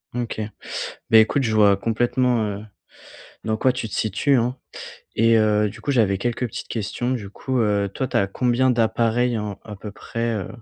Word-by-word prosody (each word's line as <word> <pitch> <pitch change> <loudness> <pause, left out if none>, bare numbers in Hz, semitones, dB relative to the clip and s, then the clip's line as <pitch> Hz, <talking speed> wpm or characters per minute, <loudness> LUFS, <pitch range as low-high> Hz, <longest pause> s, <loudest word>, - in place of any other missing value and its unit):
OK. 120 -2 -3 0.7
Bah 110 - +8
écoute, 125 +6 +4
je 110 -3 0
vois 100 -2 +5
complètement, 120 +2 +1
heu, 105 +1 -5 0.8
dans 110 0 0
quoi 130 - +3
tu 125 -3 -4
te - - -7
situes, 110 +7 +1
hein. 125 +2 0 0.6
Et 115 +1 +4
heu, 105 -1 +3
du - - -9
coup, - - -5
j'avais 105 -7 +2
quelques 120 +2 -1
petites 120 +2 -7
questions. 115 +3 -3
Du 110 -6 -3
coup, 130 +2 -2
heu, 100 -2 +1
toi 130 - -2
tu - - -1
as 100 - +2
combien 125 +5 +1
d'appareils 115 0 +1
en 105 -2 -5
à 105 - -8
peu 105 +1 -8
près, 115 +2 -3
heu, 100 - -3
115 Hz, 190 wpm, -22 LUFS, 105-125 Hz, 0.8 s, Bah